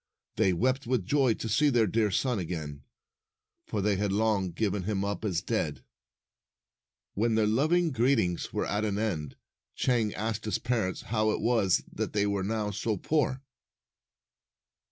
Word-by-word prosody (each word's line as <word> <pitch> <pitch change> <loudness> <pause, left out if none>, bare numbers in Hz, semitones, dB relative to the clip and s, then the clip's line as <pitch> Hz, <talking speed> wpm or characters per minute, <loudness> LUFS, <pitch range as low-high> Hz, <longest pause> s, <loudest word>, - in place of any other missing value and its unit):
They 95 - +3
wept 130 +8 0
with 120 -7 0
joy 135 -2 +3
to - - -5
see 140 +8 +3
their 120 -4 +3
dear 110 +2 +1
son 120 +3 0
again, 80 -5 -5 0.9
for 105 -3 -2
they 105 -1 +2
had 100 0 0
long 105 -2 +1
given 100 +3 -1
him 100 +1 -1
up 100 +2 -3
as 95 -5 -1
dead. 80 - -2 1.3
When 115 +2 +1
their 110 -1 +3
loving 155 +10 +2
greetings' 120 -8 +1
were - - -1
at 105 +1 -1
an 105 -2 -1
end, 90 -10 -2 0.4
Chang 115 -5 +1
asked 110 0 -3
his 105 -3 0
parents 110 -7 -1
how 110 0 0
it - - 0
was 110 -6 +2
that - - -3
they 105 -1 +2
were 100 -1 0
now 105 0 -1
so 105 +1 -2
poor. 135 - 0
110 Hz, 160 wpm, -29 LUFS, 95-120 Hz, 1.3 s, They